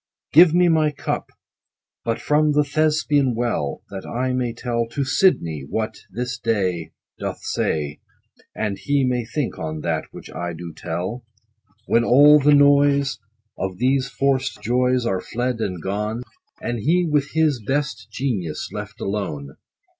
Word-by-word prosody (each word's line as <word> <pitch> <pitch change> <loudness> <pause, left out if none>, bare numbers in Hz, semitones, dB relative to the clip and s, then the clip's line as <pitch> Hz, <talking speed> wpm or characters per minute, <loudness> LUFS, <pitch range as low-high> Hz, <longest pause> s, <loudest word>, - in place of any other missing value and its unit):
Give 165 +2 +8
me 175 +2 +4
my 160 -2 +3
cup, 145 - -4 0.7
but 115 -1 -1
from 150 0 +2
the 150 0 +4
Thespian 145 -3 +1
well, 115 - -2
That 95 -1 -6
I 130 +1 -2
may 125 -2 0
tell 115 0 -2
to 140 +4 -2
SIDNEY 85 - +2
what 110 -1 -2
This 125 +5 -4
day 90 -8 -1 0.3
Doth - - -5
say, 75 -1 -1 0.6
And 100 -3 -2
he 140 +7 +1
may 125 -2 0
think 130 +3 -3
on 80 -1 -4
that - - -1
Which - - -11
I 85 +1 -4
do 85 0 -8
tell; 90 +9 -4 0.6
When 115 - +3
all 145 +5 +7
the 145 +1 +5
noise 140 -1 +4 0.4
Of 95 -1 -3
these 130 +3 +1
forced 135 -1 0
joys, 125 +1 +2
Are 95 -5 0
fled 120 +2 -2
and 90 -5 -2
gone, 105 +6 -3 0.4
10 - - -3
And 120 -1 -1
he 175 - +2
with 150 -3 0
his 155 -6 +2
best 135 -5 -2
Genius 110 - -3
left - - -7
alone. 75 -9 -3
125 Hz, 155 wpm, -22 LUFS, 100-145 Hz, 0.7 s, Give